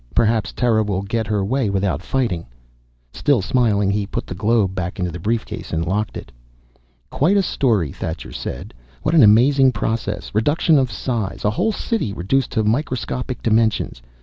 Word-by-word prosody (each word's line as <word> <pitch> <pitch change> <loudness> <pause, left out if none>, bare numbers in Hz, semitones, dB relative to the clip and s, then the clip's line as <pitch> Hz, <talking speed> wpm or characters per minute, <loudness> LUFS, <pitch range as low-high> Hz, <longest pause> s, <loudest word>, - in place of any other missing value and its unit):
Perhaps 110 -1 +2
Terra 115 -3 +2
will 100 -2 -1
get 110 +2 -2
her 105 -2 0
way 125 0 0
without 95 -2 0
fighting." 100 -8 -2 0.7
Still 145 -4 +2
smiling, 100 -1 +1
he 100 0 -1
put - - -4
the - - -6
globe 100 0 +1
back 90 -1 -4
into 90 -2 -2
the 85 - -7
briefcase 110 +6 -3
and 80 0 -1
locked 105 +4 -2
it. - - -10 0.8
"Quite 180 +8 +2
a 195 - +3
story," 110 - +1
Thacher 80 +1 -6
said. - - -6 0.3
"What 155 - 0
an 165 - +6
amazing 130 +5 +5
process, 105 -1 -3
reduction 145 +7 +3
of 130 -3 0
size 110 -3 -3
A 105 - +3
whole 220 - 0
City 210 - -2
reduced 115 +10 0
to 110 - +1
microscopic 125 +1 -2
dimensions. 110 - +1
110 Hz, 170 wpm, -20 LUFS, 100-130 Hz, 0.8 s, an